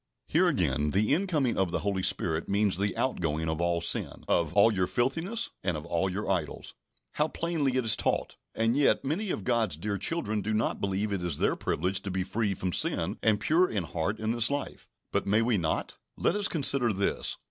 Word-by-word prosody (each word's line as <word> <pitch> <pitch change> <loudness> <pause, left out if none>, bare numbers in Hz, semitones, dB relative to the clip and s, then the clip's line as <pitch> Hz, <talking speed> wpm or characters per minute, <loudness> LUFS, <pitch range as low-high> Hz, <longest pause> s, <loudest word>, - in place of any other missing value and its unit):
Here - - +3
again, 75 +1 +1
the 105 - +2
incoming 155 - 0
of 95 -2 +1
the - - -2
Holy 100 -2 -1
Spirit 85 -4 0
means 100 -1 +2
the 100 -1 -1
outgoing 80 - -1
of 80 +1 -2
all 85 0 0
sin, 85 - +1
of 85 -3 +1
"all 105 +2 +5
your 95 -2 0
filthiness, 160 - -1
and 90 -4 0
of 75 - -8
all 90 +3 0
your 100 +3 -4
idols." 90 -7 -3 0.4
How 150 - 0
plainly 155 -5 -1
it 130 - 0
is 110 -1 +5
taught! - - -1 0.2
And 115 +2 +1
yet, 145 -1 +2
many 180 +9 -2
of 105 - -3
God's 115 -9 +1
dear 100 +4 -3
children 110 - -1
do 110 +2 -2
not 110 - -1
believe 100 +2 -1
it 100 -3 -2
is 85 -4 -1
their - - +1
privilege 95 +1 -1
to 100 - -5
be 95 0 -1
free 100 +1 -1
from 90 -1 -3
sin - - +1
and 110 -2 +2
pure 170 +9 +3
in 100 -5 -2
heart 85 +6 -3
in 110 0 -2
this 120 0 +4
life. 140 0 -4 0.2
But, - - -1
may 105 +3 +3
we 115 -4 +1
not? 80 -2 -2 0.2
Let - - +1
us 205 -1 +3
consider 140 -6 +3
this. 100 0 -1
105 Hz, 210 wpm, -28 LUFS, 90-125 Hz, 0.4 s, all